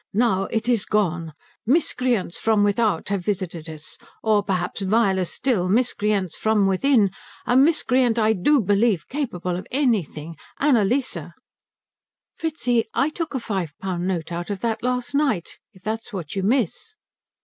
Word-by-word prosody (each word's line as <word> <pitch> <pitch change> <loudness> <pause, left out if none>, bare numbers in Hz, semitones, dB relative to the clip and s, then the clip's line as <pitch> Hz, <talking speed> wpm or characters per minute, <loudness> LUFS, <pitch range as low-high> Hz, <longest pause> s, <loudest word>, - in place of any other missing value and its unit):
Now 195 -4 +2
it 220 +3 -2
is 235 -5 +2
gone. 175 -6 0 0.3
Miscreants 250 - +1
from 220 -2 +3
without 205 -3 +1
have 200 -3 -1
visited 175 -5 -3
us. 155 -1 -8 0.2
Or 215 -2 +3
perhaps, 185 -1 -2
viler 195 -2 +2
still, 185 -2 -1
miscreants 210 -5 +1
from 220 -2 +2
within. 200 +1 +3 0.3
A 245 - +2
miscreant, 260 -4 +3
I 220 -1 +3
do 255 +8 +3
believe, 205 -3 +2
capable 200 - -3
of 180 - -6
anything 185 - -1 0.2
Annalise 255 -2 +2 0.6
" - - -69
"Fritzi, 250 -8 0
I 275 - +2
took 325 -3 -4
a - - 0
five 190 -9 -3
pound 185 -2 -3
note 175 -3 -2
out 170 +2 -4
of 200 -2 -4
that 230 -2 -1
last 250 +1 -1
night, 275 - 0
if 185 - -21
that's 225 +2 -4
what 180 -6 -6
you 195 - 0
miss." 245 - 0
210 Hz, 150 wpm, -23 LUFS, 185-245 Hz, 0.6 s, from